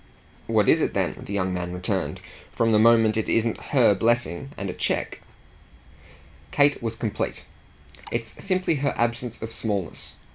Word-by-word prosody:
"What - - +2
is - - +5
it - - -1
then," - - -1
the - - -7
young 95 -2 0
man 90 -1 -3
returned 95 +1 -2 0.3
"from 115 -1 +1
the 105 - +5
moment 115 -1 +5
it 110 - -1
isn't 115 0 0
her 125 -7 +4
blessing 120 0 0
and 100 - -4
a 90 - -3
cheque?" - - -2 1.3
Kate 145 - +3
was 115 -1 -3
complete. 110 -3 -3 0.7
"It's 115 -1 -5
simply 185 -5 +1
her 140 +1 -1
absence 120 0 -2
of 110 - -6
smallness. 100 -7 -4
115 Hz, 155 wpm, -25 LUFS, 100-120 Hz, 1.3 s, is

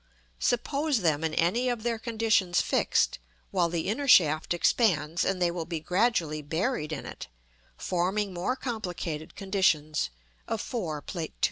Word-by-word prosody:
Suppose 280 +1 +1
them 160 -3 +1
in 160 -1 -1
any 230 +10 +2
of 240 -3 -2
their 235 -1 -1
conditions 220 -6 +1
fixed, - - +1 0.3
while 170 - +2
the 165 -1 -2
inner 270 +8 -1
shaft 155 - +5
expands, 170 -3 +2
and 190 -1 0
they 175 -1 +2
will 170 -2 -4
be 165 -2 -3
gradually 175 -3 +1
buried 160 - -2
in 155 - -4
it, - - -8 0.5
forming 190 +3 -1
more 180 +9 -1
complicated 180 - -5
conditions 170 - +1 0.4
of 225 - -2
4, 175 - -4
Plate 165 -4 -5
II. - - -39
180 Hz, 150 wpm, -28 LUFS, 160-225 Hz, 0.5 s, shaft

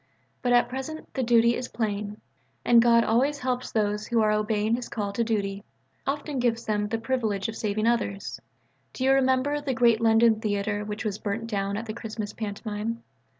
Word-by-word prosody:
But 245 - 0
at 245 0 +5
present 265 +5 -6
the 265 - -1
duty 235 -1 +4
is 250 - -4
plain. 210 -2 -3 0.5
And 235 -1 +7
God 235 0 +5
always 265 +6 +2
helps 250 -1 -2
those 210 -1 0
who 235 -2 +1
are 215 -1 +3
obeying 215 +1 +1
His 245 0 -6
call 205 -3 -3
to 235 - +1
duty: 200 -3 -2 0.4
often 290 0 -2
gives 235 -1 0
them 210 -1 0
the 225 +2 -1
privilege 225 -5 -1
of 225 - -5
saving 215 0 -1
others. 230 -4 -1 0.5
Do 260 - -4
you 265 - +4
remember 270 +2 +2
the 275 -3 -2
great 235 -2 +4
London 225 0 +4
theatre 205 -1 -1
which 210 +2 -5
was 210 -1 -2
burnt 220 +2 -3
down 200 -2 -2
at 225 +2 -5
a 215 - -4
Christmas 220 -2 -5
pantomime? 215 +1 -4
225 Hz, 190 wpm, -26 LUFS, 210-245 Hz, 0.5 s, And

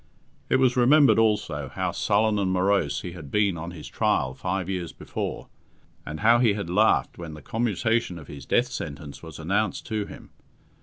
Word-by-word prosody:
It - - +3
was 130 -2 +3
remembered, 135 +2 +5
also, 100 -11 +1
how - - -2
sullen 105 0 +1
and 95 -2 0
morose 95 -6 +1
he 90 - -6
had 85 -5 -10
been 100 +1 +2
on 85 +1 -5
his 85 -3 -9
trial 65 - 0
five 90 +5 -3
years 90 -3 -3
before, - - -5 0.6
and 80 +4 -5
how 115 +2 +5
he 115 -4 +4
had 100 -5 -4
laughed 105 0 +2
when 80 -3 -7
the 75 - -11
commutation 115 -3 0
of 80 - -10
his 70 -2 -10
death - - +2
sentence 70 -1 -6
was 80 -2 -10
announced 100 +7 -1
to 110 -2 -2
him. - - -12
95 Hz, 185 wpm, -25 LUFS, 80-110 Hz, 0.6 s, remembered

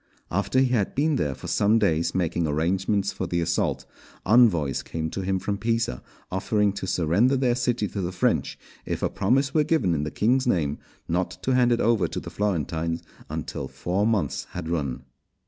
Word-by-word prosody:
After 100 +7 0
he 130 -1 +4
had 115 -6 0
been 150 +1 +2
there 70 - -1
for - - -11
some 105 +2 +3
days 85 -6 +1
making 85 -2 0
arrangements 95 +6 0
for 95 - -3
the 85 0 -1
assault, 85 0 0 0.4
envoys 95 - +4
came 80 -1 -4
to 95 - -3
him 95 0 0
from 100 +2 -3
Pisa 115 - -1 0.3
offering 105 +1 +1
to 95 - -5
surrender 95 - +2
their 125 -2 +2
city 120 -3 0
to 100 - -4
the 90 0 -2
French 90 - 0 0.3
if - - -4
a - - +2
promise 135 +7 +1
were 155 - +4
given 150 - +1
in 75 - 0
the 75 - -2
king's 125 - +1
name, 75 -10 +1 0.3
not 90 +2 0
to 130 - +1
hand 125 -1 +4
it 120 - +2
over 110 -6 +2
to - - -4
the - - -9
Florentines 85 -4 -1 0.3
until 65 - -4
four 95 +9 -1
months 100 - 0
had 90 -3 -5
run. 70 -6 -2
95 Hz, 190 wpm, -25 LUFS, 85-115 Hz, 0.4 s, he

